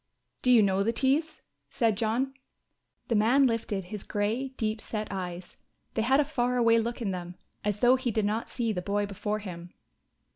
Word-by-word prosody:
"Do 250 - +1
you 240 -4 +7
know 195 -1 +2
the 220 +3 +2
Tees?" 275 +7 0 0.3
said 225 -4 +1
John. 235 +5 0 0.7
The - - 0
man 240 +6 +5
lifted 230 -5 -1
his 195 +3 -7
grey 215 +6 -1
deep 220 -4 -3
set 215 -1 -4
eyes; 180 -2 -6 0.4
they 220 - 0
had 265 +5 +3
a 295 - +3
far 250 -4 0
away 230 -1 +5
look 235 +1 -3
in 200 - -1
them, 175 -1 -6 0.3
as 205 0 -1
though 250 +1 +6
he 255 -1 -2
did 220 -2 0
not 215 +3 -1
see 230 -3 -1
the 180 - -2
boy 205 +2 0
before 210 +1 -3
him. 175 -4 -8
220 Hz, 190 wpm, -28 LUFS, 200-245 Hz, 0.7 s, you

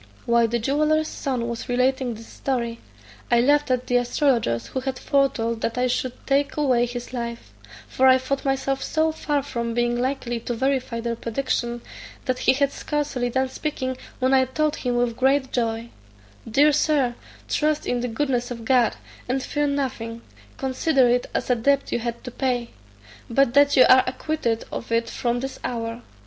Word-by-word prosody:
While 235 0 +4
the 235 +1 0
jeweller's 305 +6 +1
son 255 -4 -3
was 235 0 -5
relating 255 0 +1
this 225 +1 -11
story, 235 -3 -3 0.5
I 240 - +4
laughed 290 +3 +3
at 255 0 +1
the 245 - +2
astrologers 240 - +1
who 260 - -4
had 260 0 -3
foretold 230 -5 0
that 230 - -2
I 250 - +2
should 250 0 -1
take 280 +1 +1
away 250 -5 +2
his 245 +1 -7
life; 235 -1 -5 0.3
for 265 - +3
I 260 0 +7
thought 270 +1 -2
myself 270 0 0
so 315 0 +1
far 295 -2 -1
from 235 -4 -3
being 240 0 +1
likely 245 -1 -2
to 240 +1 -4
verify 260 -2 -1
their 235 0 -2
prediction, 240 0 -2 0.4
that 255 -1 -1
he - - +4
had 280 +1 +1
scarcely 285 -6 -2
done 260 +2 0
speaking, 260 -2 -3 0.2
when 260 +1 +2
I 260 -1 +5
told 300 +4 -1
him 245 -1 -1
with 240 -1 +1
great 265 +1 +2
joy, 230 -1 -1 0.6
"Dear 290 +7 +5
Sir, 290 -4 +2 0.3
trust 305 0 0
in 245 - 0
the 245 - -2
goodness 245 0 -1
of 235 -2 -7
God, 245 -2 +3 0.3
and 260 +1 0
fear 295 +2 0
nothing; 240 -5 -3 0.3
consider 265 0 +2
it 245 +1 +1
as - - 0
a - - +4
debt 275 +4 +1
you - - 0
had 235 0 -4
to 250 - -7
pay; 245 -2 -1 0.6
but 245 0 +3
that 285 +1 +5
you 255 - +9
are 255 0 +7
acquitted 255 -4 -2
of 230 - -6
it 230 0 +1
from 240 0 -1
this 270 0 -5
hour. 230 0 -3
255 Hz, 180 wpm, -24 LUFS, 235-275 Hz, 0.6 s, you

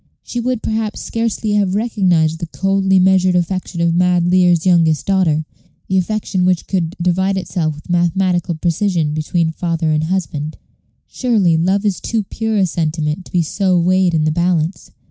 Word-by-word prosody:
She 240 - -5
would 245 -1 -2
perhaps 220 -1 -2
scarcely 230 -1 -2
have 200 -2 +1
recognized 180 -8 +1
the 170 - -4
coldly 195 +2 +1
measured 185 0 +3
affection 180 0 -2
of 170 0 +2
mad 180 0 +2
Lear's 175 -1 +3
youngest 165 -4 +3
daughter 170 -6 +1 0.4
the 190 0 +2
affection 195 -1 -1
which 180 -1 +1
could 175 -3 -2
divide 190 +3 +1
itself 165 -4 -2
with 150 - -14
mathematical 175 0 0
precision 170 -1 0
between 160 +2 -1
father 165 -1 -2
and 155 0 0
husband. 160 -4 -3 0.5
Surely, 210 -10 +1
love 190 +5 +1
is 200 -3 -1
too 225 -2 -1
pure 220 +2 -3
a 195 - +3
sentiment 160 0 -2
to - - -15
be 175 -2 +1
so 185 +3 0
weighed 180 0 +2
in 155 - +1
the 155 - +1
balance. 170 +1 -1
180 Hz, 165 wpm, -17 LUFS, 165-195 Hz, 0.5 s, measured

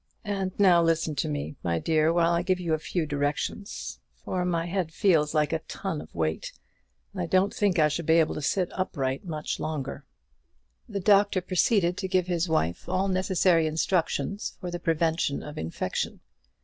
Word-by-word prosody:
And 195 -2 -1
now 185 -4 +6
listen 165 -1 +1
to 155 - 0
me, 145 -1 -4
my 85 -2 0
dear, 155 - +2
while 170 0 +3
I 170 0 +2
give 185 +1 0
you 170 -3 -1
a 155 - +1
few 165 +1 -2
directions; 145 +8 -3 0.2
for 180 -1 -3
my 170 -2 0
head 175 -2 -2
feels 160 -5 +2
like 150 +1 +2
a 160 - +1
ton 180 -6 -4
weight, 80 -2 -2 0.6
and - - -4
I 85 - -2
don't 190 +2 +2
think 200 -4 +1
I 155 -2 +5
shall 150 +2 -3
be 160 - +4
able 165 -2 +3
to - - -5
sit 180 +5 0
upright 135 -6 -2
much 155 -3 -4
longer." 150 -4 -4 0.9
The 200 -2 -3
doctor 200 0 +4
proceeded 180 0 +2
to 190 - -2
give 185 -1 +2
his 175 -1 -1
wife 85 - -1
all 185 +2 +1
necessary 185 -3 +3
instructions 165 +3 -1
for 180 -3 -5
the 175 - -4
prevention 165 -3 0
of 150 - -7
infection. 80 +1 -3
170 Hz, 180 wpm, -27 LUFS, 155-185 Hz, 0.9 s, now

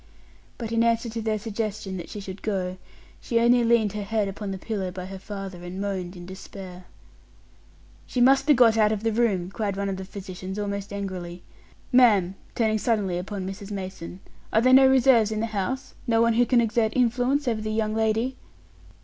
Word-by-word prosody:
But 230 -2 -5
in 230 0 +2
answer 230 0 +1
to 225 +1 -4
their 215 -1 0
suggestion 210 -3 -4
that 170 - -7
she 210 - -6
should 195 -1 -8
go, 185 -3 -2 0.4
she 235 -2 +1
only 240 +1 +4
leaned 230 -3 +3
her 210 - -3
head 210 0 -1
upon 195 +1 -5
the 190 - -3
pillow 195 -1 -3
by 180 0 -7
her 190 0 -8
father 195 -3 -7
and 180 +2 -6
moaned 190 -2 -3
in 175 -1 -9
despair. 185 -1 -10 1.2
"She 250 - -3
must 270 +3 +5
be 295 - +6
got 230 -2 +5
out 215 -1 +4
of 215 -1 -2
the 225 -1 +1
room," 200 -6 +1
cried 200 -2 -2
one 200 0 -1
of 190 - -3
the 190 - -6
physicians, 190 0 -7
almost 200 -1 -3
angrily. 185 -3 -5 0.5
"Ma'am," 210 -8 +5 0.2
turning 220 -2 +1
suddenly 200 -6 0
upon 190 +1 -5
Mrs. 195 +1 -7
Mason, 190 -2 -6 0.3
"are 220 - +4
there 255 +2 +4
no 265 0 +8
reserves 255 -4 +5
in 215 - -2
the 225 - 0
house 230 +5 -3
no 225 -1 +3
one 230 0 +4
who 240 +1 +3
can 245 -2 +4
exert 225 -1 +1
influence 255 +3 +1
over 225 -3 0
the 215 - -3
young 215 0 0
lady?" 225 +4 0
210 Hz, 200 wpm, -25 LUFS, 190-230 Hz, 1.2 s, no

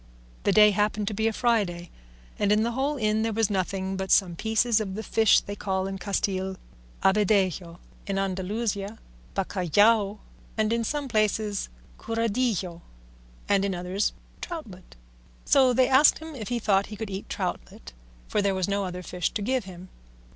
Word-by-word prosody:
The - - +4
day 210 +1 +7
happened 210 0 0
to - - -5
be 220 +2 0
a - - +2
Friday, 205 -8 0 0.5
and 205 -1 +2
in 210 +1 +4
the 235 - 0
whole 275 +4 -1
inn 215 -2 +1
there 225 0 0
was 220 -1 +1
nothing 190 0 -2
but 190 0 -4
some 180 -4 +3
pieces 220 +3 +1
of 190 -3 -4
the 220 - -4
fish 220 +1 +4
they 205 - -7
call 190 -2 -2
in 195 0 -5
Castile 190 -1 -2 0.5
"abadejo," 190 -4 +2 0.3
in 195 -1 -1
Andalusia 200 +2 -2 0.4
"bacallao," 205 +3 +2 0.4
and 220 +1 +1
in 235 0 0
some 290 +4 -2
places 215 -3 0 0.3
"curadillo," 225 -6 -1 0.7
and 200 -1 +3
in 195 -2 -1
others 180 +3 -1 0.3
"troutlet;" 225 - -8 0.5
so 265 -2 +5
they 255 +1 +3
asked 270 +3 +6
him 320 0 -9
if 225 -7 -7
he 245 - -1
thought 200 -3 +2
he 215 - -8
could 215 -1 -6
eat 190 +1 -6
troutlet, - - -5 0.3
for 210 - 0
there 200 -1 +1
was 185 -2 -1
no 200 0 0
other 180 0 -6
fish 180 0 -2
to 210 - -2
give 255 0 0
him. 185 0 -11
205 Hz, 170 wpm, -26 LUFS, 190-225 Hz, 0.7 s, day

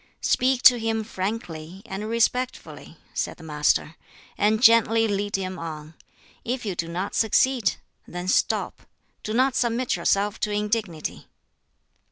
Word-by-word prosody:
"Speak 255 0 +2
to 245 -2 +8
him 225 0 -1
frankly, 185 -4 -5
and 205 +3 -5
respectfully," 245 +2 -2 0.2
said - - -3
the - - -14
Master, 150 +1 0 0.4
"and 215 +1 +2
gently 225 -1 +5
lead 205 0 -1
him 185 -2 -3
on. 155 -1 -7 0.5
If 245 0 -3
you 200 - -2
do 170 -1 -3
not 180 +4 -4
succeed, 230 -1 +2 0.3
then 180 +1 -6
stop; - - 0 0.4
do 215 - -5
not 260 +4 +2
submit 245 0 0
yourself 205 +2 0
to - - -1
indignity." 210 -6 -2
210 Hz, 135 wpm, -24 LUFS, 180-230 Hz, 0.5 s, to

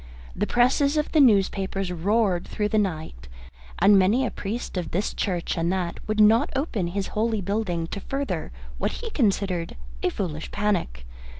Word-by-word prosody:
The - - -1
presses 270 +4 +3
of 300 - 0
the 315 - +3
newspapers 195 -5 +2
roared 185 +1 +1
through 210 -1 -2
the 215 - +2
nights, 155 - -3 0.5
and 200 -1 +6
many 215 +8 +3
a - - -2
priest 215 +3 -5
of 175 -4 -3
this 195 +5 -1
church 180 -4 -2
and 170 +1 +1
that 180 -2 -2
would 215 0 -1
not 215 +2 +5
open 250 - -1
his 190 +2 -3
holy 220 0 0
building 195 -4 -1
to - - -4
further 260 - -3 0.3
what - - -1
he 460 -1 -6
considered 195 - 0 0.2
a - - +2
foolish 160 -5 -4
panic. 185 - -1
200 Hz, 170 wpm, -25 LUFS, 175-225 Hz, 0.5 s, and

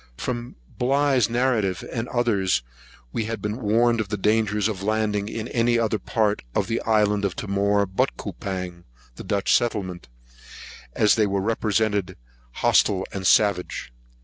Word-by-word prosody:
From 120 -1 -4 0.2
Bligh's 135 -1 +2
narrative, 115 -7 0
and 115 -1 -2
others, 100 - +1 0.5
we 110 - -1
had 115 +1 -4
been 105 +4 -4
warned 115 +2 +2
of 105 - -5
the 105 - -2
danger 105 +1 +1
of 105 -2 -1
landing 105 0 0
in 110 0 -4
any 120 0 +2
other 110 -2 0
part 105 -4 0
of - - +2
the 115 0 -2
island 105 -2 +2
of 100 -3 -1
Timor 100 0 +1
but 95 0 -1
Coupang, 90 -3 -6 0.3
the - - -9
Dutch 100 -1 +1
settlement, 95 - -1 0.9
as 105 -2 +4
they 110 -2 +2
were 100 0 0
represented 105 -2 0 0.3
hostile 95 +8 +2
and 95 -2 -2
savage. 90 - +2
105 Hz, 150 wpm, -24 LUFS, 100-115 Hz, 0.9 s, as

